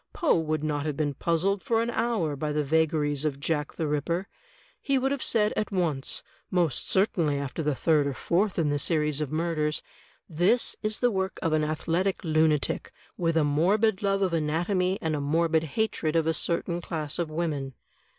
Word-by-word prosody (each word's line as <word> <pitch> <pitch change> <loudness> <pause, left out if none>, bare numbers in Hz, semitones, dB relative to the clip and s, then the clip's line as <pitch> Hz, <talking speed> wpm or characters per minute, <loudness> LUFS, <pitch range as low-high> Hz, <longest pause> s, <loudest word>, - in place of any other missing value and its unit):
Poe 335 - +2
would 155 -1 -1
not 150 -1 -1
have 150 -2 -3
been 145 -2 0
puzzled 175 +7 0
for 225 -1 +1
an 230 +1 0
hour 215 -12 0
by 150 +2 -2
the 150 0 0
vagaries 150 -1 +1
of 145 -3 -1
Jack 150 0 -2
the 160 - -2
Ripper. 170 +6 -1 0.5
He 275 -1 +1
would 265 +1 +1
have 280 -2 -2
said 215 -2 +1
at 215 - -2
once 165 -8 -1
— - - -33
most 170 -8 +1
certainly 175 -7 +2
after 140 +3 -4
the 150 -2 0
third 150 0 +2
or 140 - -3
fourth 190 +8 0
in 160 -4 +2
the 145 0 0
series 150 -2 +1
of 150 -2 -3
murders 155 -1 -1 0.3
— - - -35
'This 180 +9 +2
is 215 0 -1
the 245 -1 +3
work 190 -1 -2
of 165 -2 +1
an 155 -1 +2
athletic 165 +5 -1
lunatic, 155 -3 +1 0.2
with 165 -2 0
a 160 - +4
morbid 190 +8 +2
love 195 -1 +1
of 185 -3 0
anatomy 175 +4 0
and 160 -1 0
a 145 - -2
morbid 160 +2 +1
hatred 170 -8 0
of 165 -1 +3
a 160 - +2
certain 170 +2 -1
class 155 -3 -3
of 170 -2 -1
women. 150 -5 -3
160 Hz, 200 wpm, -27 LUFS, 150-185 Hz, 0.5 s, a